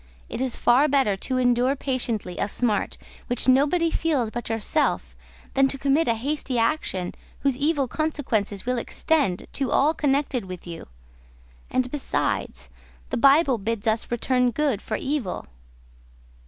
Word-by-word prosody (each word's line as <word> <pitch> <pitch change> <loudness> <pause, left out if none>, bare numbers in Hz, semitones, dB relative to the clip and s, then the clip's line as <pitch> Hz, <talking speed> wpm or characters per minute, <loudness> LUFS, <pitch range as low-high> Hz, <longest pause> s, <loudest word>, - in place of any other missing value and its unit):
It 230 - -4
is 260 -2 0
far 260 +5 +4
better 270 -8 +2
to 255 +7 -3
endure 250 +2 +2
patiently 240 -9 -2
a - - +1
smart 210 -1 0 0.3
which 245 +1 0
nobody 295 +6 +3
feels 280 -11 0
but 240 -1 -5
yourself, 225 +7 0 0.4
than 270 0 +4
to 275 - -2
commit 280 +4 +2
a 230 - +3
hasty 270 +1 -2
action 230 - 0 0.3
whose 275 -2 +2
evil 285 0 +1
consequences 245 -10 -1
will 250 0 0
extend 270 - 0
to 270 -2 -1
all 300 +3 +3
connected 280 -6 0
with 185 -2 -8
you; 170 -2 -8 0.8
and 255 -1 0
besides, 65 - -2 0.4
the - - 0
Bible 275 -1 +5
bids 225 +1 -3
us 220 0 0
return 250 +1 +1
good 265 -4 0
for 215 - -3
evil." 270 -9 -3
255 Hz, 145 wpm, -24 LUFS, 225-280 Hz, 0.8 s, Bible